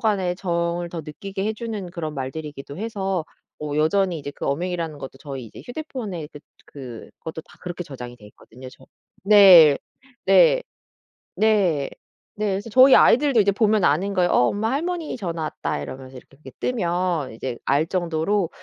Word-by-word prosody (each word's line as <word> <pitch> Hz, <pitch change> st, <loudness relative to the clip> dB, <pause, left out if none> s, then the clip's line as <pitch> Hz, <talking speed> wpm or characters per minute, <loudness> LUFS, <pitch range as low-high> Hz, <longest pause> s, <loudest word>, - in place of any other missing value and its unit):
간의 190 Hz, -5 st, 0 dB
정을 170 Hz, -1 st, -2 dB
더 170 Hz, -2 st, -6 dB
느끼게 195 Hz, +5 st, -6 dB
해 220 Hz, -, 0 dB
주는 215 Hz, -5 st, -6 dB
그런 155 Hz, -3 st, -5 dB
말들이기도 140 Hz, +2 st, -6 dB
해서 195 Hz, -6 st, -2 dB, 0.3 s
뭐 150 Hz, -1 st, -4 dB
여전히 175 Hz, +2 st, +2 dB
이제 145 Hz, 0 st, -6 dB
그 -, -, -5 dB
어맹이라는 165 Hz, +1 st, -2 dB
것도 135 Hz, -1 st, -9 dB
저희 135 Hz, -4 st, -7 dB
이제 110 Hz, -, -12 dB
휴대폰에 240 Hz, -, -6 dB, 0.4 s
그 125 Hz, -5 st, -10 dB
그것도 160 Hz, -1 st, -7 dB
다 -, -, -21 dB
그렇게 180 Hz, 0 st, -6 dB
저장이 125 Hz, -4 st, -9 dB
돼 105 Hz, -, -17 dB
있거든요 125 Hz, +4 st, -14 dB
저 130 Hz, -, -18 dB, 0.4 s
네. 185 Hz, -8 st, +8 dB, 0.5 s
네. -, -, +5 dB, 0.7 s
네. 195 Hz, -10 st, +2 dB, 0.4 s
네. 215 Hz, 0 st, -2 dB
그래서 215 Hz, +2 st, -8 dB
저희 260 Hz, +3 st, +7 dB
아이들도 260 Hz, -2 st, +5 dB
이제 200 Hz, 0 st, +3 dB
보면 215 Hz, -1 st, +2 dB
아는 190 Hz, +8 st, +2 dB
거예요. 180 Hz, -1 st, +2 dB
"어 125 Hz, -, +4 dB
엄마. 220 Hz, +3 st, -1 dB
할머니 335 Hz, 0 st, -2 dB
전화 170 Hz, -5 st, -4 dB
왔다." 155 Hz, -, -3 dB
이러면서 130 Hz, -, -9 dB
이렇게 135 Hz, +2 st, -15 dB
그게 140 Hz, -3 st, -12 dB
뜨면 175 Hz, -, -1 dB
이제 120 Hz, +1 st, -5 dB
알 145 Hz, +4 st, +2 dB
정도로. 175 Hz, +1 st, 0 dB
175 Hz, 350 characters per minute, -23 LUFS, 145-205 Hz, 0.7 s, 네